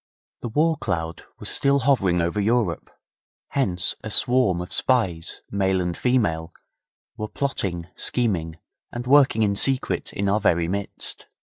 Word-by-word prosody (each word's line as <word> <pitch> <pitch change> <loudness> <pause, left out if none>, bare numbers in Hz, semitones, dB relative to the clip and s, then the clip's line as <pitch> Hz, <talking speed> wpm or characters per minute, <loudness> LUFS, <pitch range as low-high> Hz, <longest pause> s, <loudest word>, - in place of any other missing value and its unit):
The 120 - -5
war 155 +6 +2
cloud 80 - -3
was - - -7
still 140 0 +2
hovering 100 -10 +2
over 85 +5 -1
Europe; 110 -5 0 0.6
hence 95 - +1
a - - -5
swarm 125 -8 +3
of 90 - -7
spies, 95 -11 0
male 95 -1 +1
and 90 -1 -2
female, 85 -11 0 0.7
were 105 - -3
plotting, 95 -11 -2
scheming, 85 -10 -1 0.3
and 120 +1 -5
working 135 -4 +5
in 100 -1 +1
secret 130 +5 0
in 100 - -2
our 100 +2 +2
very 85 -4 +2
midst. 100 +3 -3
100 Hz, 140 wpm, -23 LUFS, 85-125 Hz, 0.7 s, working